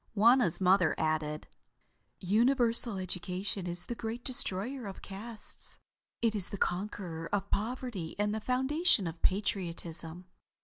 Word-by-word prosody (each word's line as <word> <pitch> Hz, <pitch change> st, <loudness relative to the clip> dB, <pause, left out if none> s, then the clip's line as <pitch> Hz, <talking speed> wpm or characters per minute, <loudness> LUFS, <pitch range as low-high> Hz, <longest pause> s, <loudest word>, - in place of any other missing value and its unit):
Wauna's 230 Hz, -4 st, +4 dB
mother 185 Hz, -3 st, +3 dB
added: 155 Hz, -1 st, -2 dB, 0.7 s
"Universal 235 Hz, +2 st, +2 dB
education 185 Hz, +1 st, +1 dB
is 175 Hz, 0 st, -6 dB
the -, -, -4 dB
great 230 Hz, +2 st, -6 dB
destroyer 245 Hz, 0 st, +2 dB
of 195 Hz, -, -9 dB
castes. 215 Hz, +3 st, -11 dB, 0.5 s
It 230 Hz, -2 st, +2 dB
is 200 Hz, -4 st, -3 dB
the 200 Hz, -, -6 dB
conqueror 175 Hz, -4 st, -3 dB
of 200 Hz, -1 st, -2 dB
poverty 220 Hz, -6 st, -3 dB
and 205 Hz, 0 st, 0 dB
the 220 Hz, -, -3 dB
foundation 265 Hz, -, +3 dB
of 165 Hz, 0 st, -6 dB
patriotism. 175 Hz, -3 st, -2 dB
200 Hz, 125 wpm, -31 LUFS, 175-235 Hz, 0.7 s, Wauna's